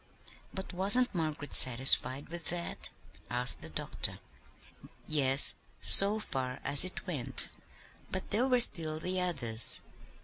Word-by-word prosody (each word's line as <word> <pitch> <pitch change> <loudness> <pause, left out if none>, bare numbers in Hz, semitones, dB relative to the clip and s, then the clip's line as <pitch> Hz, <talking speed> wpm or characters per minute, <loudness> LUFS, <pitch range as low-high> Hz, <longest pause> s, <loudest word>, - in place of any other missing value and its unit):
"But 190 0 -12
wasn't 205 +8 +2
Margaret 155 -4 -8
satisfied 130 +2 +4
with 170 -1 -12
that?" 170 +1 -3 0.4
asked 125 +1 0
the 80 - -12
doctor. 75 - -4 0.9
"Yes, 140 -2 +3 0.3
so 200 +2 +5
far 130 -9 -9
as 145 +2 +5
it 185 - -4
went: 135 -8 0 0.6
but 190 - -9
there 235 +6 -3
were 250 -2 -1
still 155 -7 +1
the 185 +3 -7
others. 120 - -2
155 Hz, 125 wpm, -27 LUFS, 130-185 Hz, 0.9 s, so